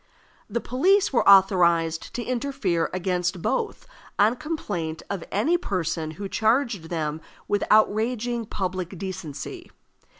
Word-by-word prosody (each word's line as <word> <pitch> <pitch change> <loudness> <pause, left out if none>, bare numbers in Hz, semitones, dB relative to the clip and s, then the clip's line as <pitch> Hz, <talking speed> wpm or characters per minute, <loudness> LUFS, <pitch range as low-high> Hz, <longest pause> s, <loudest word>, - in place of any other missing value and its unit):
The 235 - -1
police 370 - +2
were 235 - +4
authorized 170 -4 +4
to 245 - -2
interfere 245 -10 -1
against 180 -1 -1
both 460 -3 -1 0.3
on 215 +4 +4
complaint 175 - -4
of 195 -4 -3
any 320 - +2
person 165 - -2
who 200 0 -4
charged 220 - +1
them 155 -2 -2 0.3
with 205 -1 +1
outraging 225 +2 +2
public 185 -2 -4
decency. 165 -7 -6
195 Hz, 120 wpm, -25 LUFS, 170-240 Hz, 0.3 s, were